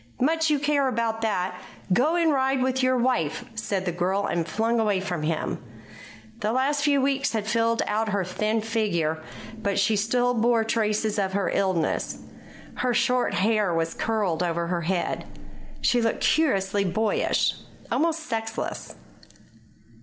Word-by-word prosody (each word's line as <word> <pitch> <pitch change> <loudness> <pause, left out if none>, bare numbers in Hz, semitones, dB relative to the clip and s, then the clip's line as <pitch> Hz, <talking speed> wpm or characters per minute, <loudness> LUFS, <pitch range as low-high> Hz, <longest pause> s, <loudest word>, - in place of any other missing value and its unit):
"Much 320 +4 +2
you 300 - +3
care 285 -1 +1
about 230 -2 -1
that. 190 -4 0 0.4
Go 295 - +3
and 335 -2 +3
ride 265 -1 +1
with 260 0 0
your 255 0 +3
wife," 235 - 0
said 200 -4 -2
the 175 - 0
girl, 185 +4 0
and 170 -1 -1
flung 225 +7 0
away 210 -3 +2
from 180 -4 -3
him. 155 +1 -2 0.8
The 210 - 0
last 275 +4 +1
few 290 -2 +3
weeks 275 -1 +1
had 215 -2 -1
filled 230 +1 +1
out 215 +1 0
her 200 -2 0
thin 215 +5 -1
figure, 185 -8 -1 0.4
but 200 -2 -1
she 200 +2 +3
still 245 +4 +1
bore 230 0 +2
traces 215 -1 0
of 190 -1 -1
her 200 -1 0
illness. 185 -4 0 0.6
Her 250 -1 0
short 250 0 +2
hair 205 -1 +2
was 165 0 0
curled 205 -7 -1
over 170 -1 0
her 170 0 -1
head. 175 +2 -2 0.5
She 245 - +3
looked 225 -1 0
curiously 200 -10 +2
boyish, 205 +4 +1 0.3
almost 330 0 +1
sexless. 225 -6 -4
220 Hz, 155 wpm, -25 LUFS, 190-250 Hz, 0.8 s, you